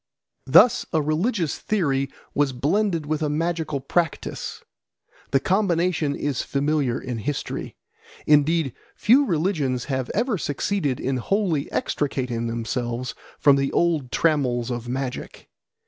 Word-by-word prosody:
Thus 205 - +6
a 160 - +3
religious 160 - 0
theory 140 -10 0 0.2
was 145 -2 +1
blended 165 +5 0
with 155 +1 -2
a 150 - 0
magical 160 -1 -1
practice. 165 +3 -2 0.7
The 135 - +3
combination 175 -5 +1
is 145 -3 -1
familiar 140 -3 0
in 125 -3 -5
history. 140 +6 -4 0.5
Indeed, 150 -1 +3 0.2
few 265 +6 +5
religions 155 - 0
have 130 -3 -2
ever 230 -3 +1
succeeded 145 -1 -1
in 130 0 -1
wholly 170 - 0
extricating 125 -5 -1
themselves 120 +1 -3 0.2
from 140 -1 +5
the 135 0 0
old 160 -7 +1
trammels 130 -7 +1
of 120 0 -4
magic. 130 0 -5
145 Hz, 120 wpm, -24 LUFS, 130-170 Hz, 0.7 s, Thus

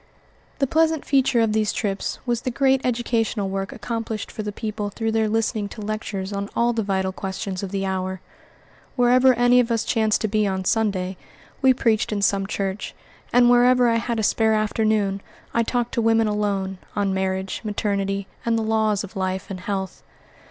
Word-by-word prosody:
The 275 - +2
pleasant 320 +2 +1
feature 270 -3 +3
of 220 -2 +2
these 215 -1 +1
trips 200 -3 -2
was 240 -2 0
the - - -2
great 265 +1 +2
educational 230 -4 0
work 195 0 -3
accomplished 225 -3 -4
for - - -5
the 210 -1 -4
people 210 -1 -4
through 225 +2 -2
their 220 -1 +1
listening 220 -1 0
to 215 - -9
lectures 205 -2 -4
on 200 +1 -3
all 235 +1 +2
the 225 - 0
vital 190 -2 -1
questions 190 0 -4
of 195 - -4
the 195 0 -2
hour. 190 0 -2 0.8
Wherever 250 +1 +5
any 245 +1 +5
of 245 -1 +2
us 230 -2 +1
chanced 220 -1 +1
to 220 - +1
be 215 0 +1
on 190 -1 -2
Sunday, 190 -4 0 0.4
we 265 -1 +6
preached 230 -4 +1
in 205 -1 -1
some 195 0 +2
church; 195 0 -3 0.4
and 245 0 +5
wherever 245 0 +5
I 230 -1 +3
had 230 0 -2
a - - 0
spare 220 +1 +3
afternoon, 215 -2 +1 0.3
I 230 - +3
talked 240 +1 -1
to 235 - +1
women 225 0 +3
alone, 200 -3 -1 0.2
on 200 -2 0
marriage, 190 0 -2
maternity, 200 -2 -1 0.2
and 230 -1 +1
the 225 - 0
laws 220 -2 +1
of 200 +2 -10
life 190 0 -3
and 185 - -5
health. 190 0 -4
215 Hz, 185 wpm, -23 LUFS, 195-230 Hz, 0.8 s, we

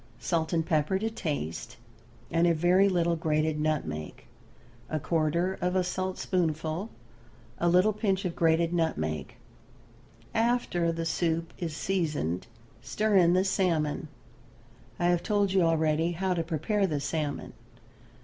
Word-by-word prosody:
Salt 160 -2 -1
and 165 -2 +1
pepper 155 +2 +1
to 220 +3 -2
taste, 125 - -4 0.5
and 170 +1 +3
a 170 - +3
very 180 +5 +4
little 170 -2 +1
grated 155 -1 0
nutmeg; 140 - -2 0.7
a 155 - -1
quarter 170 +4 0
of 180 +1 0
a 185 - +3
saltspoonful, 180 -1 -2 0.7
a 175 - +2
little 185 +5 +4
pinch 195 -2 0
of 175 - -2
grated 165 +1 +2
nutmeg. 80 - -1 1.0
After 225 -8 +1
the 165 0 -3
soup 165 0 -1
is 160 -4 -4
seasoned 150 - -1 0.3
stir 210 - 0
in 175 -1 +5
the 185 +1 +3
salmon. 170 -7 0 0.9
I 175 - -1
have 175 -1 +3
told 205 -2 +1
you 190 - +4
already 165 0 +2
how 185 +2 0
to 170 - 0
prepare 185 +5 0
the 150 -4 -1
salmon. 145 0 -3
170 Hz, 135 wpm, -28 LUFS, 155-185 Hz, 1.0 s, in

